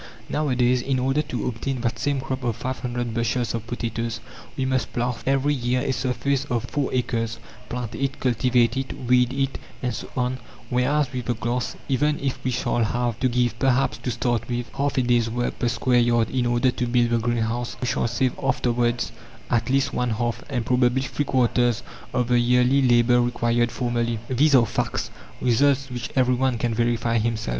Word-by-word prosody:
Nowadays, 125 -4 +2
in 135 +1 0
order 135 +3 +1
to 135 -5 -4
obtain 125 +2 -3
that 115 -1 -1
same 140 -2 0
crop 130 -1 -4
of 120 -3 0
500 120 -1 -3
bushels 115 -1 0
of 115 -1 -4
potatoes, 115 -1 -3 0.4
we 130 - 0
must 130 -1 0
plough 120 0 0
every 135 +2 +2
year 125 -1 0
a 135 -1 0
surface 135 +2 0
of 120 -5 -1
four 140 +3 -2
acres, 115 -2 -1 0.3
plant 120 -2 -4
it, 135 +4 -2
cultivate 120 -1 +2
it, 135 0 -3
weed, 125 0 +4
it, 135 0 -1 0.2
and 125 -2 0
so - - -6
on; 125 0 0 0.3
whereas 130 +2 +1
with 125 -2 -3
the 120 - 0
glass, 120 +2 -2
even 145 +3 +1
if 135 -2 -3
we 130 - 0
shall 120 -1 0
have 120 0 -1
to 130 - +2
give 120 -2 0
perhaps, 135 0 +2
to - - -3
start 120 -1 -1
with, 120 0 -2
half 140 0 -1
a 130 - +3
day's 120 -2 +2
work 120 +2 -2
per 120 - +1
square 125 +1 +2
yard 120 -1 +2
in 125 -2 +1
order 120 +2 +2
to 125 - -2
build 120 0 +2
the 120 - +3
greenhouse 120 +1 -1
we - - -2
shall 120 - 0
save 120 +2 0
afterwards 120 -2 +1 0.4
at 120 +1 +1
least 135 +1 +1
one 125 0 0
half, 120 +1 -2
and 125 -5 -2
probably 125 +1 +2
three 145 +2 -2
quarters 120 -2 +2 0.3
of 125 -1 0
the 120 0 +3
yearly 125 +3 +4
labour 120 -1 +4
required 120 -1 +1
formerly. 120 -1 -1
These 140 +3 +4
are 120 -3 +6
facts, - - -2 0.3
results 135 +2 +2
which 120 -2 -4
every 125 -1 +3
one 130 -1 +1
can 120 0 -1
verify 115 0 +1
himself. 115 - -1
125 Hz, 190 wpm, -24 LUFS, 120-130 Hz, 0.4 s, are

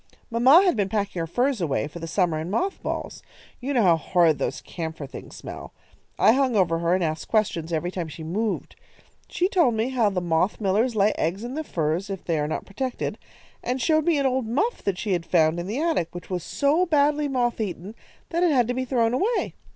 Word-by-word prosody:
Mamma 260 +10 +6
had 365 -6 +3
been 200 -3 0
packing 200 -3 -2
her 165 - -2
furs 245 - 0
away 145 -3 0
for 165 +3 -9
the 165 - -6
summer 170 -3 +1
in 160 +2 -4
moth 370 - -1
balls. - - -4 0.4
You 265 +3 -3
know 245 -5 +3
how 170 -3 +5
horridly 165 0 +2
those - - -2
camphor 160 -3 -6
things 135 - -10
smell. - - -9 0.4
I - - +6
hung 260 -1 +2
over 170 -5 +2
her 170 +1 +2
and 185 - 0
asked 155 0 -2
questions 175 -7 0
every 170 +2 -1
time 175 -3 -4
she 160 +1 -9
moved. 205 +7 -2 0.5
She 360 - 0
told 340 - +3
me 220 +3 0
how 240 -5 +2
the 195 -2 -1
moth 175 +2 0
millers 215 +4 +1
lay 205 0 +4
eggs 180 +7 -1
in 245 +2 -5
the 315 +2 -3
furs 170 - -2
if 195 -2 -5
they 165 -3 0
are 150 - 0
not 155 - -3
protected, 250 +5 -4 0.4
and 250 +2 -1
showed 310 +5 +2
me 335 -3 +3
an 280 - +1
old 260 -3 0
muff 405 - 0
that 195 -3 0
she 200 0 -1
had 175 -2 0
found 165 -1 +2
in 175 - -4
the 220 +7 -2
attic, 310 - 0
which 175 +2 -8
was 180 -3 -2
so 300 - +1
badly 295 -1 +2
moth 245 -4 0
eaten 195 0 -5 0.4
that 340 +1 -1
it 355 - +4
had 250 -5 +3
to - - +1
be 255 +1 -2
thrown 235 -2 +1
away. 420 - 0
210 Hz, 230 wpm, -24 LUFS, 170-260 Hz, 0.5 s, Mamma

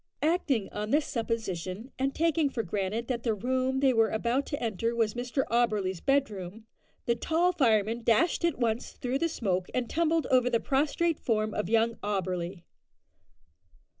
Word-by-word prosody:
Acting 300 - +1
on 210 +1 -4
this 295 +4 +2
supposition, 220 -2 -3
and 270 +1 0
taking 325 -2 +2
for 235 -4 -3
granted 205 +4 -2
that 245 -3 -2
the 225 -3 0
room 260 +4 0
they 270 -2 +4
were 225 -2 +3
about 235 +5 0
to 285 - -3
enter 230 +1 -1
was 225 -2 +1
Mr 245 +2 -1
Auberly's 210 -7 +1
bedroom, 220 -7 -1 0.4
the 235 - +3
tall 330 +8 +1
fireman 230 - +2
dashed 240 +11 +2
at 340 -3 +1
once 235 -1 -1
through 255 +2 -2
the 335 - +1
smoke, 185 - -1
and 250 -2 0
tumbled 330 -1 +1
over 250 -1 +4
the 235 -2 +2
prostrate 300 +5 +1
form 215 -2 0
of 210 -3 -2
young 230 +1 +2
Auberly. 185 -3 -3
235 Hz, 165 wpm, -29 LUFS, 215-275 Hz, 0.4 s, they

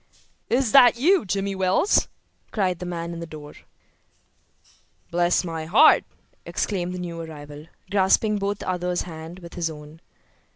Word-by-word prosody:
"Is 250 -2 +1
that 245 -2 +7
you, 340 - +3
Jimmy 195 +1 -2
Wells?" 190 - +2 0.4
cried 185 -5 -1
the 180 - -5
man 170 -1 -4
in 170 - -7
the 170 - -6
door. 150 -2 -10 1.6
"Bless 175 +1 +2
my 165 -2 -5
heart!" 205 - +6 0.4
exclaimed 180 -3 -3
the - - -5
new 170 -2 -5
arrival, 150 -1 -10 0.2
grasping 205 +2 +2
both 200 0 -2
the - - -9
other's 180 -1 -1
hands 165 +1 -9
with 170 - -11
his 170 -2 -2
own. 150 +1 -11
180 Hz, 150 wpm, -24 LUFS, 165-200 Hz, 1.6 s, that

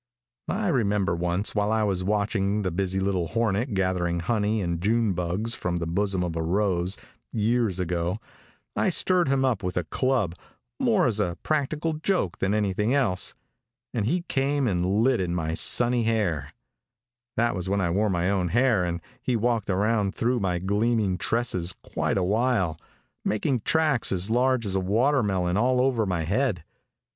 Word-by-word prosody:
I 210 +2 -1
remember 105 - +1
once 90 +4 -1
while 105 0 0
I 110 -1 +2
was 95 -3 0
watching 100 0 0
the 95 - -1
busy 95 +2 -1
little 95 -3 0
hornet 110 - 0
gathering 90 -2 0
honey 110 +2 0
and 85 -3 -2
June 110 +1 +2
bugs 90 +6 -2
from 90 -6 -2
the 85 - -2
bosom 95 +2 0
of 85 -2 -3
a 80 - -1
rose, 90 +1 0 0.3
years 110 -3 +1
ago, 90 +1 -1 0.6
I - - +2
stirred 180 -3 +2
him 135 0 +2
up 120 -6 0
with 90 -2 -3
a 90 - +1
club, 125 0 0 0.5
more 225 -9 +3
as 110 -4 +1
a 90 -4 -1
practical 155 +1 -1
joke 155 - -1
than 100 +2 +1
anything 105 +4 +1
else, 110 -10 0 0.6
and 110 -4 -1
he 175 +6 0
came 140 -2 0
and 90 -5 0
lit 110 +6 +2
in 90 -1 -2
my 80 -2 -2
sunny 120 +7 +3
hair 85 -11 0 0.9
that 120 -1 +2
was 90 0 -3
when 100 +1 +1
I 85 -3 0
wore 105 +4 +1
my 90 -1 0
own 95 -2 +1
hair 120 0 +2
and 85 -1 -2 0.2
he 125 -1 0
walked 115 -2 0
around 100 +1 +1
through 120 +1 +1
my 90 -3 0
gleaming 100 0 0
tresses 95 -7 0
quite - - -1
awhile, 100 -2 +1 0.5
making 125 +4 0
tracks 150 +1 +1
as 95 +3 +1
large 125 0 +2
as 95 -1 0
a - - +2
watermelon 100 -3 +1
all 125 +3 +2
over 125 -5 +1
my 90 -3 -1
head. 100 - 0
105 Hz, 170 wpm, -26 LUFS, 90-120 Hz, 0.9 s, more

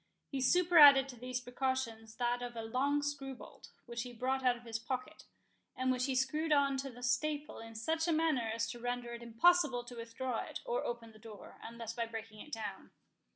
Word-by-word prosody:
He 270 -2 -2
superadded 290 -3 +7
to 250 - -8
these 250 +1 -4
precautions 245 -3 -3
that 245 0 0
of 245 -1 -5
a 225 - -4
long 275 +6 +1
screw 275 -2 -3
bolt, - - -13 0.2
which 235 -1 -4
he 250 +1 -6
brought 260 +3 -1
out 250 -1 +3
of 240 - -16
his 225 -1 -4
pocket, 255 +6 -5 0.5
and 255 0 +1
which 255 0 +1
he 265 - 0
screwed 305 +5 0
on 280 -2 +4
to 270 +1 -3
the 245 0 -11
staple 295 +4 -1
in 225 0 -10
such 320 +9 -1
a - - +3
manner 310 -8 +2
as 230 0 -1
to 240 - -8
render 245 0 -3
it 235 - -7
impossible 250 +2 +3
to 245 0 -10
withdraw 235 +1 -3
it, - - -5
or - - -1
open 235 -1 -5
the 215 - -17
door, 215 -2 -12
unless 230 0 -6
by 235 -1 -2
breaking 225 -1 -8
it 300 - -11
down. 220 -4 -5
250 Hz, 210 wpm, -34 LUFS, 230-275 Hz, 0.5 s, superadded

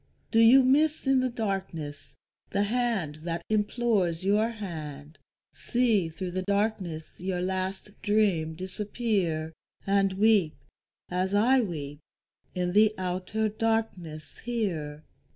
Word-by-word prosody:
Do 225 - +4
you 240 +4 +8
miss 295 +4 +3
in 270 -1 +4
the 255 0 +1
darkness 190 -10 -4 0.3
the 200 - +1
hand 215 -9 -1
that 170 +2 -4
implores 210 -5 +1
your 210 +3 +2
hand, 155 -9 -7 0.3
See 225 -8 +1
through 180 +3 -5
the 185 +1 -2
darkness 195 -5 -1
your 180 0 -2
last 190 +2 -2
dream 195 -7 +1
disappear, 185 -3 -2 0.3
And 195 -1 +2
weep, 200 -5 +3 0.6
as 185 +2 0
I 250 +6 +5
weep, 145 -8 -5 0.6
in 180 -1 -1
the 215 +1 +5
outer 185 +4 -1
darkness 215 -8 -2
here? 170 -11 -3
195 Hz, 115 wpm, -28 LUFS, 170-220 Hz, 0.6 s, you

